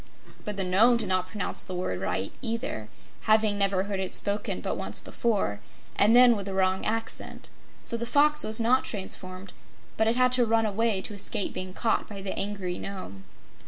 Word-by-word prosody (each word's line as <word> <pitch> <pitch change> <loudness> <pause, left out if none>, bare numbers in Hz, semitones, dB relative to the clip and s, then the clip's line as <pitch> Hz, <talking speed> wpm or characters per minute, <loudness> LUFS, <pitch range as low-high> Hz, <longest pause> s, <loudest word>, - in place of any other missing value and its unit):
But 210 -2 -4
the 195 - +1
Nome 215 +7 +4
did 235 - +1
not 185 -1 0
pronounce 200 +1 -4
the 185 - -7
word 180 - -3
aright, 95 +1 -2
either, 225 - -4 0.4
having 215 -1 +3
never 195 -1 +2
heard 200 -1 -4
it 190 -1 -1
spoken 205 +1 0
but - - -3
once - - +1
before, 200 - -1 0.4
and 215 +3 +4
then 245 -1 +7
with 200 -2 -5
a 195 - -4
wrong 190 0 +1
accent. 225 +1 -1 0.3
So 235 - +1
the 235 +1 -4
Fox 300 +3 +3
was 220 +1 +1
not 245 +3 +3
transformed, 190 -2 -6 0.4
but 220 - +2
it 225 - +2
had 250 0 +3
to 250 -1 +4
run 225 0 +2
away 215 -1 0
to 215 - -5
escape 200 0 0
being 185 0 -6
caught 225 -2 0
by 200 -2 -8
the 195 - -3
angry 195 -3 -3
Nome. 100 - -8
205 Hz, 195 wpm, -27 LUFS, 185-225 Hz, 0.4 s, then